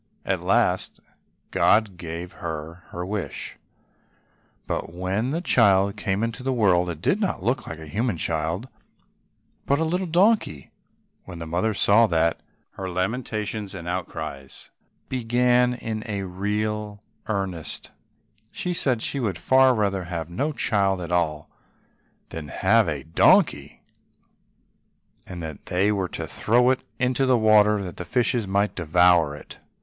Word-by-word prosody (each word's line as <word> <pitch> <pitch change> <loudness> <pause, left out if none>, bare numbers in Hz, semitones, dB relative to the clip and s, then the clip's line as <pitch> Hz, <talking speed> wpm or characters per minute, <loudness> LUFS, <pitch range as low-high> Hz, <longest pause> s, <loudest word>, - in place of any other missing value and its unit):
At - - -1
last - - +1 0.5
God 105 -3 +3
gave 85 +1 -6
her 85 0 -7
her 90 +1 -5
wish, 100 0 -5 1.1
but - - -3
when 95 +7 -2
the 160 +5 -1
child 100 - +3
came 100 0 -1
into 115 +2 -3
the 135 +1 -1
world, 95 -7 +3
it 85 0 -6
did 200 - +2
not 190 - -1
look 120 +4 -1
like 80 - -6
a 80 - -10
human 110 +5 -1
child, 80 +8 -2 1.0
but 140 - +3
was - - -2
a 160 - -2
little 180 +1 -1
donkey. 175 - +2 0.5
When 90 -2 -9
the 85 - -6
mother 90 +7 -1
saw 110 +4 +5
that, 85 -2 +1 0.3
her 95 -1 -6
lamentations 105 +1 -3
and 85 -2 -7
outcries 80 -6 -6 0.4
began 125 0 +2
in 110 -2 -4 0.3
real 105 +1 -2 0.2
earnest; 95 -6 -3 0.6
she 180 - -3
said 130 -8 0
she 140 - -2
would 105 -8 -1
far 130 +6 +4
rather 100 -4 0
have 85 -2 -5
had 85 - -11
no 145 +5 0
child 100 -8 +1
at 85 -1 -6
all 75 -4 0 0.8
than 80 -2 -7
have 105 +8 +3
a 70 -4 -4
donkey, 80 0 +3 1.4
and 90 -2 -7
that 80 -2 -8
they 95 +4 +2
were 95 -3 -1
to - - -5
throw 125 +3 +2
it 130 - -1 0.2
into 130 +1 +1
the 130 -1 +4
water 105 -2 +4
that 90 -2 -7
the - - -4
fishes 120 +3 0
might 100 +2 +1
devour 85 -2 +3
it. - - -12
100 Hz, 145 wpm, -24 LUFS, 85-115 Hz, 1.4 s, saw